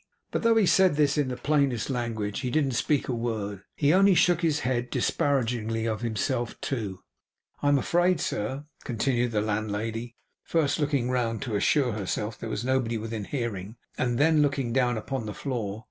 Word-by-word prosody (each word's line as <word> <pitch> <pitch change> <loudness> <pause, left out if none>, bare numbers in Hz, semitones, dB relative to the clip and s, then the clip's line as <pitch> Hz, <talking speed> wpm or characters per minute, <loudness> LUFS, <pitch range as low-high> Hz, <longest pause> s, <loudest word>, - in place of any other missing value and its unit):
But - - -1
though 230 -1 +4
he 220 -3 +4
said 185 -3 +4
this 145 -1 +3
in 145 -3 +1
the 125 -1 -4
plainest 140 -7 +1
language, 115 -4 -2
he 130 -2 -2
didn't 140 0 +1
speak 140 +4 0
a 130 - -1
word. 110 -4 -3
He 145 +1 +3
only 195 0 +5
shook 175 0 +4
his 155 -3 +1
head; 120 -1 -1
disparagingly 115 -5 0
of 110 0 -2
himself 120 +1 -2
too. 100 -8 -4 0.6
'I 145 - +1
am 145 0 +5
afraid, 175 +5 +2
sir,' 130 +7 -3 0.2
continued 120 0 0
the 110 -2 0
landlady, 110 +2 -3 0.3
first 160 -2 +1
looking 140 -4 0
round 120 -2 -1
to 120 -5 -3
assure 125 +5 +2
herself 105 +1 -2
that - - -28
there - - -4
was 110 +2 -3
nobody 125 -3 +1
within 110 -1 -4
hearing, 110 -6 -4 0.2
and 120 -2 0
then 155 +2 +4
looking 135 -5 0
down 125 -2 +2
upon 115 +1 -4
the 105 - -5
floor. 110 -7 -3
120 Hz, 185 wpm, -27 LUFS, 110-145 Hz, 0.6 s, only